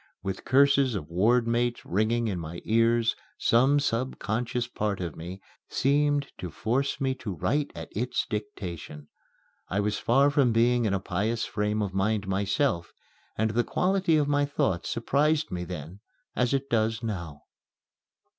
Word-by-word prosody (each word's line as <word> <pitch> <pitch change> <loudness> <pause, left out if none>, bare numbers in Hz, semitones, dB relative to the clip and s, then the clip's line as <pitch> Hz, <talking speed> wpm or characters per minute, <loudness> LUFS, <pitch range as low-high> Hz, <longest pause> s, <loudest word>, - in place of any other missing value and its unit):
With 95 0 -4
curses 140 -2 +4
of 80 -4 -5
ward 115 +7 +3
mates 120 +1 0
ringing 110 +5 +1
in 95 -4 -2
my 85 +1 -6
ears, 115 0 +3 0.2
some 130 +5 +4
subconscious 120 -2 -1
part 105 -4 -2
of 85 -4 -4
me 90 +4 -7 0.3
seemed 145 +1 +1
to 90 - -5
force 125 +10 -1
me 135 -1 +1
to 110 -7 -6
write 145 - 0
at - - -7
its 120 +4 -1
dictation. 90 -8 -6 0.6
I 100 - 0
was 105 +1 0
far 135 +4 +4
from 135 -5 +3
being 120 +1 +3
in 100 -2 +1
a - - 0
pious 105 +6 -1
frame 105 0 -1
of 95 -2 -4
mind 100 +1 0
myself, 95 0 0 0.5
and 110 +1 +1
the 120 +2 +2
quality 185 -1 +2
of 145 -2 +2
my 145 0 +2
thought 115 -11 0
surprised 150 +6 +1
me 90 0 -3
then 90 +1 -7 0.4
as 125 -1 +1
it 135 0 0
does 115 0 0
now. 85 -9 -5
115 Hz, 155 wpm, -27 LUFS, 95-130 Hz, 0.6 s, curses